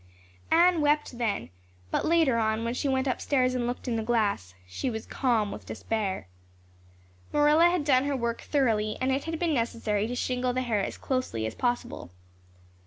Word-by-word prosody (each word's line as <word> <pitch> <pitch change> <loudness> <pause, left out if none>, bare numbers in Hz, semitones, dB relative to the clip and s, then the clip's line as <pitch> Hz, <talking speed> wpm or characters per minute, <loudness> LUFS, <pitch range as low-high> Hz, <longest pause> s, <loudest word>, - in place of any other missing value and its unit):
Anne 340 0 +5
wept 295 -4 +1
then, 210 - -1 0.4
but - - 0
later 315 -8 +3
on, 220 0 0
when 230 +1 -1
she 265 - -2
went 265 0 +1
upstairs 255 -1 +1
and 245 -1 -1
looked 245 +2 -4
in 235 -2 0
the - - -1
glass, 205 - 0
she 95 - -3
was 220 -2 -5
calm 230 -6 0
with - - -9
despair. 205 - -3 1.0
Marilla 300 +3 +5
had 350 -4 0
done 265 -2 +4
her 285 -1 0
work 235 -1 -2
thoroughly 220 -7 +1
and 260 +1 +1
it 270 +1 -1
had 325 0 -3
been 335 -1 0
necessary 230 -4 0
to 245 - -4
shingle 250 0 -1
the 255 +1 -1
hair 220 -5 0
as - - -4
closely 255 - -2
as 110 - -3
possible. 245 - -2
245 Hz, 180 wpm, -28 LUFS, 220-280 Hz, 1.0 s, Anne